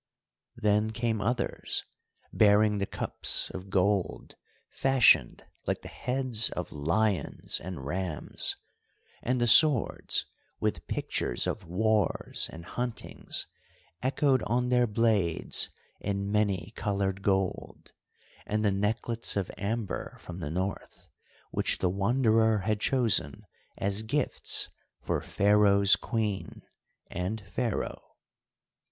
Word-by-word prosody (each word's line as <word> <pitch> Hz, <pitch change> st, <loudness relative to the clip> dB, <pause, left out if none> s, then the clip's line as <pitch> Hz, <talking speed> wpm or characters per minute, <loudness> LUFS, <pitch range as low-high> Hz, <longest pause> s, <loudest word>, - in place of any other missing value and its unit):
Then 105 Hz, +1 st, +1 dB
came 115 Hz, -1 st, -1 dB
others, 120 Hz, +4 st, -1 dB, 0.5 s
bearing 105 Hz, 0 st, +4 dB
the 100 Hz, -, -1 dB
cups -, -, +1 dB
of 95 Hz, +1 st, -8 dB
gold 95 Hz, 0 st, 0 dB, 0.4 s
fashioned 130 Hz, -, +3 dB, 0.2 s
like -, -, -1 dB
the -, -, -8 dB
heads 125 Hz, -3 st, +1 dB
of -, -, -5 dB
lions 90 Hz, +7 st, -1 dB
and 85 Hz, -6 st, -6 dB
rams, 90 Hz, +1 st, -2 dB, 0.7 s
and 125 Hz, +1 st, 0 dB
the 120 Hz, -, +2 dB
swords 135 Hz, +1 st, +5 dB, 0.3 s
with -, -, -2 dB
pictures -, -, -1 dB
of 100 Hz, -6 st, -4 dB
wars 105 Hz, +2 st, 0 dB
and 85 Hz, +1 st, -10 dB
huntings 120 Hz, +4 st, -3 dB, 0.6 s
echoed 130 Hz, 0 st, +2 dB
on 125 Hz, +2 st, 0 dB
their 125 Hz, -1 st, +3 dB
blades 105 Hz, -6 st, +1 dB, 0.3 s
in 100 Hz, 0 st, -3 dB
many 100 Hz, -2 st, 0 dB
coloured 100 Hz, -2 st, -1 dB
gold, 95 Hz, -1 st, -2 dB, 0.6 s
and 105 Hz, +1 st, 0 dB
the 100 Hz, -, +3 dB
necklets 110 Hz, +3 st, 0 dB
of 95 Hz, -3 st, -2 dB
amber 105 Hz, -1 st, -4 dB
from 90 Hz, +1 st, -9 dB
the 85 Hz, -, -4 dB
North, 95 Hz, +5 st, -5 dB, 0.4 s
which -, -, 0 dB
the 90 Hz, -, 0 dB
Wanderer 110 Hz, +2 st, +2 dB
had 110 Hz, +1 st, -1 dB
chosen 120 Hz, -1 st, +1 dB, 0.3 s
as 100 Hz, +2 st, -1 dB
gifts 125 Hz, +6 st, 0 dB, 0.4 s
for -, -, -1 dB
Pharaoh's 100 Hz, -1 st, +4 dB
Queen 110 Hz, -5 st, -3 dB, 0.5 s
and 90 Hz, +5 st, -3 dB
Pharaoh. 120 Hz, 0 st, -4 dB
105 Hz, 110 wpm, -29 LUFS, 95-115 Hz, 0.7 s, swords